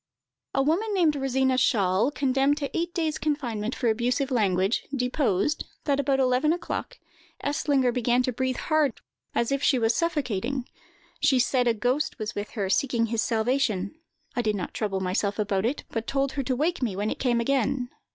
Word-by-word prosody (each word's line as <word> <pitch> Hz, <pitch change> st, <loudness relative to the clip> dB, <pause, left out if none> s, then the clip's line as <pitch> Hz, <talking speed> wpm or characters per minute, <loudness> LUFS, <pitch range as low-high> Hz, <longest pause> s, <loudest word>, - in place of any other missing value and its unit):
A 270 Hz, -, +3 dB
woman 395 Hz, +9 st, +1 dB
named 330 Hz, -5 st, +3 dB
Rosina 265 Hz, -1 st, +1 dB
Schahl, 205 Hz, -2 st, +2 dB
condemned 275 Hz, 0 st, +1 dB
to 280 Hz, -2 st, -4 dB
eight 340 Hz, +1 st, -1 dB
days' 315 Hz, -3 st, -1 dB
confinement 245 Hz, -7 st, -2 dB
for 245 Hz, -, -1 dB
abusive 250 Hz, +5 st, 0 dB
language, 195 Hz, -3 st, +2 dB
deposed, 250 Hz, -1 st, 0 dB, 0.2 s
that 280 Hz, -2 st, +1 dB
about 275 Hz, -1 st, +1 dB
eleven 255 Hz, +3 st, +3 dB
o'clock, 350 Hz, -, -3 dB, 0.5 s
Eslinger 285 Hz, -3 st, +1 dB
began 245 Hz, 0 st, +2 dB
to 255 Hz, -, 0 dB
breathe 260 Hz, +1 st, -1 dB
hard 310 Hz, -5 st, +1 dB, 0.4 s
as 235 Hz, +2 st, +1 dB
if 275 Hz, 0 st, 0 dB
she 275 Hz, -, +3 dB
was 225 Hz, -1 st, +2 dB
suffocating; 265 Hz, -, -1 dB, 0.5 s
she 270 Hz, -, +4 dB
said 250 Hz, 0 st, +2 dB
a 235 Hz, -, +3 dB
ghost 250 Hz, +7 st, 0 dB
was 215 Hz, -3 st, -4 dB
with 205 Hz, +1 st, -4 dB
her, 200 Hz, -2 st, 0 dB
seeking 230 Hz, +4 st, +1 dB
his 230 Hz, 0 st, -1 dB
salvation. 225 Hz, -4 st, 0 dB, 0.4 s
"I 245 Hz, -, +1 dB
did 215 Hz, -3 st, 0 dB
not 185 Hz, -, -4 dB
trouble 195 Hz, -3 st, -2 dB
myself 195 Hz, +2 st, -1 dB
about 205 Hz, -1 st, 0 dB
it, 270 Hz, -, -3 dB
but 225 Hz, 0 st, -3 dB
told 275 Hz, 0 st, 0 dB
her 275 Hz, +1 st, -2 dB
to 255 Hz, 0 st, -1 dB
wake 320 Hz, +6 st, 0 dB
me 225 Hz, -7 st, -1 dB
when 205 Hz, +2 st, -1 dB
it -, -, -4 dB
came 240 Hz, -3 st, +2 dB
again. 260 Hz, 0 st, 0 dB
255 Hz, 180 wpm, -26 LUFS, 225-280 Hz, 0.5 s, she